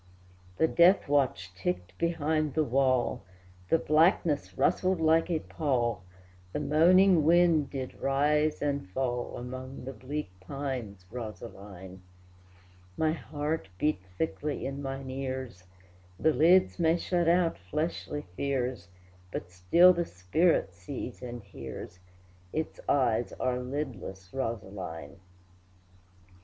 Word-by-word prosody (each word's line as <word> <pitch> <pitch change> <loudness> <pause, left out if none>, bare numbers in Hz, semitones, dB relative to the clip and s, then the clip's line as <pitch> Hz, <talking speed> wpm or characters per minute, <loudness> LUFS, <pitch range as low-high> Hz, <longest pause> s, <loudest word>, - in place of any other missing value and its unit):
The 160 - +4
death 175 +4 +5
watch 130 -11 +1
ticked 90 0 -3
behind 155 -3 0
the 155 - +3
wall, 130 -1 +1 0.5
The - - +5
blackness 160 -1 +2
rustled 185 -1 +2
like 160 +1 +3
a 160 -3 0
pall, 120 - -1 0.5
The - - -1
moaning 175 +3 +5
wind 165 -2 +4
did 130 -2 -5
rise 150 +3 +2
and 140 -9 -1
fall 125 +2 -2
Among 130 +1 -7
the 135 - -5
bleak 130 -1 -5
pines, 120 -4 -5
Rosaline! 100 -5 -8 1.0
My 155 -1 +2
heart 150 - -3
beat 150 +4 +1 0.2
thickly 150 0 -2
in 135 +1 -4
mine 135 -1 -5
ears; 130 -7 -5 0.5
The 160 - +3
lids 180 +4 +4
may 165 0 +3
shut 175 -1 0
out 170 -1 +2
fleshly 150 - -3
fears, 125 -7 -2 0.4
But 90 - -5
still 95 - +6
the 170 -1 -1
spirit 95 - +1
sees 110 +8 -7
and 120 -3 -7
hears, 90 0 -9 0.5
Its 160 0 -3
eyes 120 -4 +2
are 125 -1 -1
lidless, 125 -9 -5
Rosaline! 95 - -5
135 Hz, 115 wpm, -29 LUFS, 110-155 Hz, 1.0 s, still